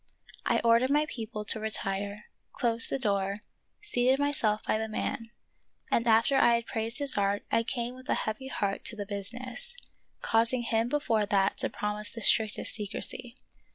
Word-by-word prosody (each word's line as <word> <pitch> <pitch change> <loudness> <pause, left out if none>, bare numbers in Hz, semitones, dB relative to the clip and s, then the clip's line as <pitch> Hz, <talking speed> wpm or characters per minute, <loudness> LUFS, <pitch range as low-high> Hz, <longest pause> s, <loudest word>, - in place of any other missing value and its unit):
I - - +2
ordered 235 +2 +4
my 295 +2 +3
people 215 -5 -6
to 220 - +3
retire, 205 -1 -3 0.3
closed 230 -1 +3
the - - 0
door, 200 -4 -1 0.4
seated 260 -10 +2
myself 255 -7 +1
by 215 - +1
the 220 - -2
man, 225 +1 -3 0.6
and 235 - +2
after 230 +4 +4
I 235 -2 +5
had 235 0 -2
praised 225 +1 -2
his 280 -7 +1
art 200 +1 0
I - - +3
came 235 +1 -3
with 255 0 -13
a - - +3
heavy 220 +5 -3
heart 200 -6 -2
to 230 - -1
the 205 -2 -5
business, 250 - -5 0.4
causing 230 +2 +2
him 230 0 0
before 230 -7 +1
that 195 -2 +1
to - - +2
promise 210 0 -3
the 230 - -8
strictest 215 +2 +2
secrecy. 230 +3 -2
225 Hz, 170 wpm, -29 LUFS, 210-245 Hz, 0.6 s, I